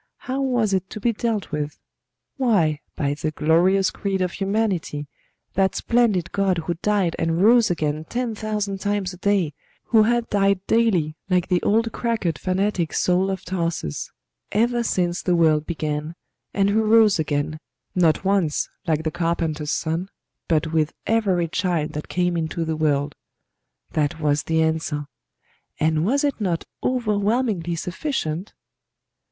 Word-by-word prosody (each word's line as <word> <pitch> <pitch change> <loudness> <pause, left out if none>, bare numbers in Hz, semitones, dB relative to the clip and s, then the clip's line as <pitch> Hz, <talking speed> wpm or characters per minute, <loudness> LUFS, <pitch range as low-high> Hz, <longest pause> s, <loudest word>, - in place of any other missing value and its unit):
How 265 +2 -3
was 245 -6 +1
it 190 0 0
to - - -7
be 235 +2 +1
dealt 220 -2 -2
with? 150 0 -3 0.6
Why, 190 - +2 0.2
by 140 -1 0
the 150 +1 -2
glorious 175 +6 +3
creed 195 -2 -2
of 180 - -1
Humanity 195 -7 -1 0.5
that 190 0 +2
splendid 220 -8 +1
God 195 -2 +1
who 175 - 0
died 200 -5 +1
and 165 0 0
rose 235 +1 +6
again 155 -2 -1
ten 240 +4 -2
thousand 210 -2 -3
times 200 -1 -1
a - - -10
day, 185 -5 +1 0.4
who 225 -2 +6
had 235 +1 +2
died 200 -1 +2
daily 185 -10 +2
like 180 -2 +1
the 180 -1 +2
old 225 +2 +2
cracked 220 -9 -1
fanatic 185 -2 0
Saul 185 +2 +2
of 190 -2 -4
Tarsus, 165 - -3 0.4
ever 240 +2 +2
since 180 -5 0
the 180 - +1
world 155 -2 +3
began, 155 -1 -3 0.4
and 200 0 +2
who 220 +2 +3
rose 215 -3 +5
again, 155 0 -1 0.3
not 175 0 +2
once 190 -6 +1 0.2
like 160 -1 +1
the 160 - -1
Carpenter's 160 -3 -1
Son, 170 +4 -2 0.4
but 160 -1 +1
with 155 0 +1
every 195 -7 +2
child 165 -2 -1
that 150 - -6
came 180 -1 0
into 165 +1 -2
the 160 0 -1
world. 145 -2 +1 0.8
That 155 +2 0
was 150 -1 +1
the 160 0 +1
answer; 160 -2 -1 0.7
and 155 0 +2
was 275 +10 +2
it 285 -5 0
not 175 -5 -1 0.2
overwhelmingly 210 -6 0
sufficient? 180 - -3
180 Hz, 150 wpm, -23 LUFS, 160-210 Hz, 0.8 s, rose